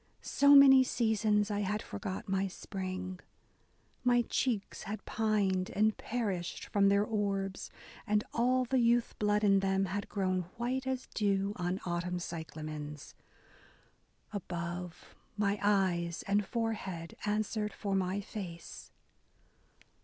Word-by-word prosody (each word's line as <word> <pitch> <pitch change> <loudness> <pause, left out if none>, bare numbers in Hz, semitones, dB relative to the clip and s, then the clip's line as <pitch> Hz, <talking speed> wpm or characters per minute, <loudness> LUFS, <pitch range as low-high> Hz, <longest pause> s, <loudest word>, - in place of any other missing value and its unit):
So 285 0 +5
many 270 -2 +9
seasons 215 -4 +1
I 205 - 0
had 210 +2 -1
forgot 195 -4 -5
my 195 0 +1
spring; 185 -1 -5 0.8
My 245 -1 +4
cheeks 230 -4 -1
had 215 - -5
pined 200 -4 +1
and 215 +1 +3
perished 200 -7 -3
from 200 -1 +3
their 200 +1 +4
orbs. 200 -3 -2 0.4
And 210 0 +2
all 255 +2 +2
the 260 +1 +1
youth 235 0 +3
blood 210 0 +2
in 195 -1 +5
them 195 0 +1
had 200 +2 -4
grown 185 -2 0 0.2
white 255 +3 -2
As 260 -1 -2
dew 200 -1 +1
on 180 +2 -2
autumn 175 0 -2
cyclamens: 155 -3 -6 1.2
above 175 -2 -5 0.2
My 205 -1 +1
eyes 185 -4 +1
and 205 +1 +2
forehead 205 -8 -3
answered 210 0 -1
for 200 -2 -3
my 190 +1 0
face." 180 -5 -8
200 Hz, 125 wpm, -32 LUFS, 185-220 Hz, 1.2 s, many